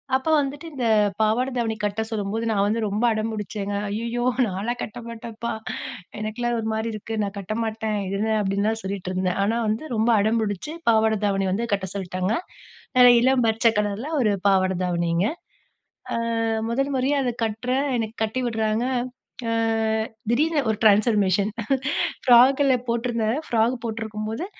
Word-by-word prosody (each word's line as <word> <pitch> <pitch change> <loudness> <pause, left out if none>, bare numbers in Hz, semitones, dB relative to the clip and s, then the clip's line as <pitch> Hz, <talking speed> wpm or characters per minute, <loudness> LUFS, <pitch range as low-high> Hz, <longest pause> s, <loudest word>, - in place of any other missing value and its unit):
அப்ப 265 +4 0
வந்துட்டு 285 +4 -3
இந்த 255 -4 -2 0.4
பாவாட 225 +4 +2
தாவணி 225 -2 0
கட்ட 205 +1 0
சொல்லும்போது, 220 +1 -2
நான் 200 -2 +2
வந்து 220 +3 0
ரொம்ப 205 +3 -1
அடம்புடிச்சேங்க. 210 -2 -3
"ஐயய்யோ! 235 +3 -2 0.2
நான்லாம் 210 +6 -3
கட்ட 215 - -5
மாட்டேம்ப்பா! 230 0 -6 0.7
எனக்கெல்லாம் 235 +3 -2
ஒருமாரி 220 0 -2
இருக்கு. 215 +1 -6
நான் 200 0 -4
கட்டமாட்டேன் 215 +1 -2
இது 195 +1 -2
என்ன?" 220 +1 0
அப்டின்லாம் 205 +3 0
சொல்லிட்டுருந்தேன். 185 -1 -2
ஆனா 225 +3 +1
வந்து 215 +6 -1
ரொம்ப 220 +2 +2
அடம்புடிச்சு 220 - 0 0.2
பாவாட 220 -1 +3
தாவணி 195 -1 +1
வந்து 225 +5 0
கட்ட 195 -1 -1
சொல்ட்டாங்க. 185 +1 -2 0.6
நல்ல 250 -1 +9
இளம் 255 -1 +3
பச்ச 225 +2 +2
கலர்ல 210 +5 -2
ஒரு 215 -4 +3 0.2
பாவாட 190 -1 +3
தாவணிங்க. 170 +2 +1 0.9
ஆ - - 0 0.5
முதல் 275 +4 0
முறையா 265 +3 +1
அத 245 - 0
கட்டுறேன், 250 +6 -1
எனக்கு 225 0 -3
கட்டி 220 +4 -1
விடுறாங்க 220 0 0 0.6
ஆ - - 0 0.8
திடீர்னு 300 +5 +2
ஒரு 220 - 0
ட்ரான்ஸ்ஃபார்மேஷன் 205 -2 +4 0.8
ஃப்ராகுல 265 +2 +6
போட்டிருந்தேன். 235 0 0
ஃப்ராக் 230 +2 +2
போட்டிருக்கும்போது 220 +4 -4
220 Hz, 135 wpm, -24 LUFS, 205-235 Hz, 0.9 s, நல்ல